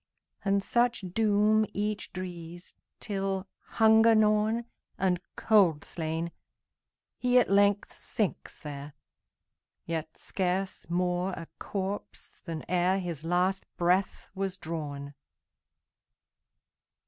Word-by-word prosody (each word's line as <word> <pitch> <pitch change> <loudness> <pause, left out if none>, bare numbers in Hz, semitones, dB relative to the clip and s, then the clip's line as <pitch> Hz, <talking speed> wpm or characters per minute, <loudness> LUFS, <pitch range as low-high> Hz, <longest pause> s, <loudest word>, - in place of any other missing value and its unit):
And 200 0 +2
such 240 -1 +2
doom 215 0 +4
each 210 0 -2
drees, 175 -1 -7 0.3
Till, 195 -1 -2 0.3
hunger 225 0 +6
gnawn, 215 +2 +3 0.3
And 180 -2 +1
cold 185 -9 +4
slain, 165 +1 -3 0.9
he 250 0 +3
at 245 - +4
length 200 0 +3
sinks 210 -5 -2
there, 145 -1 -7 0.9
Yet 160 -1 -4
scarce 190 0 -2
more 180 +1 0
a 165 - -7
corpse 195 0 -5
than 165 -3 -5
ereHis 180 -3 0
last 180 +3 +1
breath 180 +3 +1
was 190 -1 -2
drawn. 145 -4 -5
190 Hz, 95 wpm, -29 LUFS, 170-210 Hz, 0.9 s, hunger